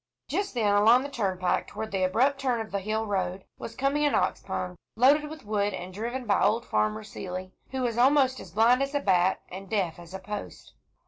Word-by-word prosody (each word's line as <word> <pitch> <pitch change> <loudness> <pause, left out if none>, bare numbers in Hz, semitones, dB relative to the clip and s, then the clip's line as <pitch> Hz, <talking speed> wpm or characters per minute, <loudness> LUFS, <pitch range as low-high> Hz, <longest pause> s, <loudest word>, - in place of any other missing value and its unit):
Just 400 -6 -2
then, 210 -4 +2
along 225 +5 +5
the 285 - -5
turnpike 185 -7 -1
toward 220 +1 -6
the 195 -1 -1
abrupt 255 +10 +2
turn 250 -3 +1
of 220 -1 -5
the 200 - -1
hill 215 +3 -2
road, 190 -2 -2
was 230 - -7
coming 275 +2 +1
an 295 - +2
ox - - +1
pung, 180 0 -4 0.2
loaded 290 +5 +4
with 310 -5 -10
wood, 205 -2 0
and 185 0 -7
driven 240 +5 -4
by 205 - +2
old 220 +3 +2
Farmer 105 0 0
Seeley, 185 0 -7 0.2
who 265 -1 -3
was 240 -1 -1
almost 260 0 +4
as - - -10
blind 235 +4 +4
as 275 +1 -2
a - - +3
bat 190 -6 +2
and 190 +1 -9
deaf 185 -6 -1
as 175 +2 -10
a - - -5
post. 205 +2 -7
215 Hz, 215 wpm, -27 LUFS, 190-260 Hz, 0.2 s, along